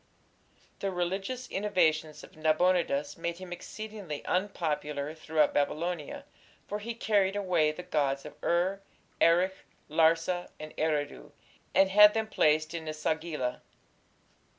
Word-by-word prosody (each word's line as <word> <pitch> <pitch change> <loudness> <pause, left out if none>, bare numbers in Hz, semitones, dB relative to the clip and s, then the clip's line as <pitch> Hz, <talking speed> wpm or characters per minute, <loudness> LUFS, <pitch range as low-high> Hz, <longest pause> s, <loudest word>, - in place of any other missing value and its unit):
The 195 - -1
religious 195 +8 -3
innovations 160 -6 0
of - - -14
Nabonidus 155 -2 +1
made 170 0 -3
him 185 -1 -7
exceedingly 205 -4 -7
unpopular 155 -6 -1
throughout 155 -1 +1
Babylonia, 155 +2 -2 0.4
for 210 - -3
he 230 +2 -5
carried 205 -4 +2
away 180 -6 +2
the 180 +4 -8
gods 140 -5 0
of - - -8
Ur, 185 +3 +1 0.4
Erech, 175 +3 +4 0.4
Larsa, 165 +3 +2
and 155 0 -9
Eridu, 145 - -2 0.4
and 190 0 +5
had 210 +1 +8
them 220 0 +1
placed 155 -6 +2
in 165 -2 -5
E 155 - -2
sagila. 155 -4 -2
170 Hz, 125 wpm, -30 LUFS, 155-190 Hz, 0.4 s, had